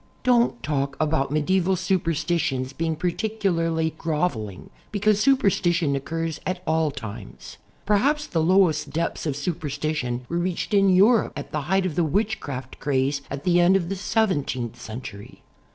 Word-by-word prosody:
Don't 240 -1 +2
talk 140 -2 -1
about 155 -3 +1
medieval 180 +5 +1
superstitions 165 -7 -1
being 160 +2 -1
par 180 +3 0
ticularly 165 -7 -1
"groveling," 150 - -2 0.2
because 210 0 +2
superstition 180 - +2
occurs 165 +3 -3
at 185 0 -3
all 160 -1 +2
times. 115 - -9 0.3
Probably 275 +9 +2
the 165 - +1
lowest 165 -4 +3
depths 165 +2 -2
of 145 - -1
superstition 145 -5 -3
were 170 - -2
reached 180 +3 -2
in 195 -1 +5
Europe 205 +5 +4
at - - -7
the 150 - -2
height 190 0 +2
of 180 - -1
the 175 - +1
witchcraft 155 - -2
craze 140 0 0
at 140 0 -5
the 175 -1 +3
end 175 +2 +5
of 175 -3 0
the 195 - -2
seventeenth 145 - -1
century. 110 -3 -9
165 Hz, 150 wpm, -24 LUFS, 140-190 Hz, 0.3 s, in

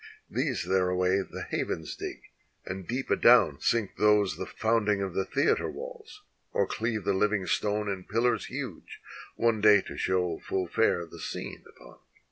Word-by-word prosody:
These - - -1
thereaway 90 +1 +2
the - - -7
havens 80 -1 -3
dig, - - -7 0.4
and 95 -1 -6
deep 130 +3 -3
adown 115 - +5
sink 115 -4 0
those 105 -2 +3
The - - -5
founding 110 -2 +1
of 95 -2 -3
the 95 - 0
theater 440 - +1
walls, 465 -4 -9 0.3
or - - +2
cleave 110 -2 -2
the 100 +1 +1
Uving 100 -1 +1
stone 105 0 0
In 95 -2 -4
pillars 115 +4 +1
huge, 130 - -7 0.4
one 115 -2 +1
day 105 -1 +7
to - - -9
show 90 -3 0
full 95 -1 -2
fair 85 -1 +1
the 85 0 -13
scene - - -6
upon. - - -16
105 Hz, 160 wpm, -28 LUFS, 95-115 Hz, 0.4 s, day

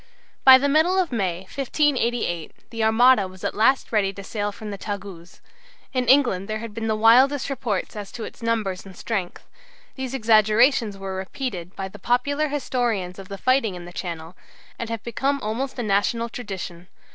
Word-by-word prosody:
By 260 -1 +10
the 280 +2 0
middle 320 +6 +3
of 365 -5 +1
May, 185 -7 -1
1588, 240 - -1
the 225 -1 -2
Armada 220 -1 +5
was 185 0 -14
at - - -1
last 240 +5 +2
ready 205 -3 +2
to 200 - -9
sail 205 0 -3
from 210 +1 -8
the 200 - -5
Tagus. 195 -5 -7 0.5
In 255 -2 0
England 240 -8 +4
there 215 0 -2
had 220 -1 -7
been 225 +1 -4
the 220 - +1
wildest 255 +6 +4
reports 235 -9 -3
as 205 -2 -7
to 230 - -6
its - - -9
numbers 220 -5 -1
and 190 -2 -13
strength. 195 -6 -4 0.5
These 265 -1 -5
exaggerations 220 0 +3
were 195 -1 -5
repeated 190 -2 -5
by 195 - -4
the 205 +2 -12
popular 285 +8 +1
historians 240 -10 -2
of 195 - -9
the 200 - -7
fighting 255 -4 +1
in 175 -1 -9
the 175 - -11
Channel, 170 -1 -6 0.4
and 235 - -4
have 230 -1 -4
become 270 +4 -1
almost 245 +6 -3
a 245 - -2
national 215 +3 +1
tradition. 190 -6 -7
220 Hz, 180 wpm, -23 LUFS, 195-255 Hz, 0.5 s, By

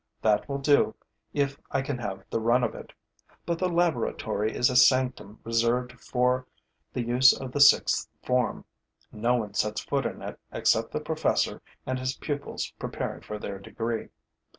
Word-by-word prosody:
That 105 +2 +2
will 140 - -1
do, 140 +1 +3 0.4
if 140 -1 -1
I 135 - 0
can 135 -2 -3
have 100 -5 -5
the - - 0
run 120 +3 +3
of - - 0
it. - - -10 0.5
But 170 -1 -1
the 185 - +1
laboratory 120 - 0
is 120 +2 +2
a - - -3
sanctum 125 -4 +3
reserved 115 +2 +1
for 125 0 +1 0.4
the 125 - -2
use 125 +2 +5
of 130 -2 -6
the 145 - -2
sixth 140 - +5
form. 125 -2 0 0.5
No 120 +3 +1
one 110 -4 -3
sets 105 0 0
foot 140 -1 -1
in - - -8
it - - -7
except - - +1
the - - -2
professor - - 0 0.2
and 130 0 -2
his 130 +1 -2
pupils 145 -1 -4
preparing - - -4
for 105 - -6
their 100 -2 -6
degree. 115 +3 -4
125 Hz, 170 wpm, -27 LUFS, 115-135 Hz, 0.5 s, use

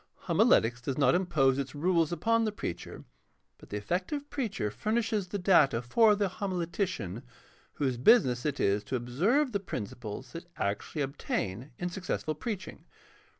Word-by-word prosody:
Homiletics 120 +2 +3
does 130 +2 -3
not 135 -3 +4
impose 140 -7 +2
its 135 -1 -4
rules 165 +1 +2
upon 230 +7 +2
the 215 - 0
preacher, 90 - -6 0.6
but - - -15
the 105 - -3
effective 185 - -2
preacher 215 - -2
furnishes 215 - -1
the 205 - -3
data 170 - +4
for 210 - +4
the 205 -1 +1
homiletician, 175 - -3 0.5
whose 130 -4 -1
business 125 - +4
it 145 -2 -2
is 100 +1 +2
to 130 - -3
observe 185 - +1
the 200 - 0
principles 105 - -6
that 170 +1 -8
actually 105 +8 -2
obtain 125 -3 -3
in 175 - -2
successful 175 -3 -3
preaching. 200 +5 -6
165 Hz, 150 wpm, -30 LUFS, 125-200 Hz, 0.6 s, not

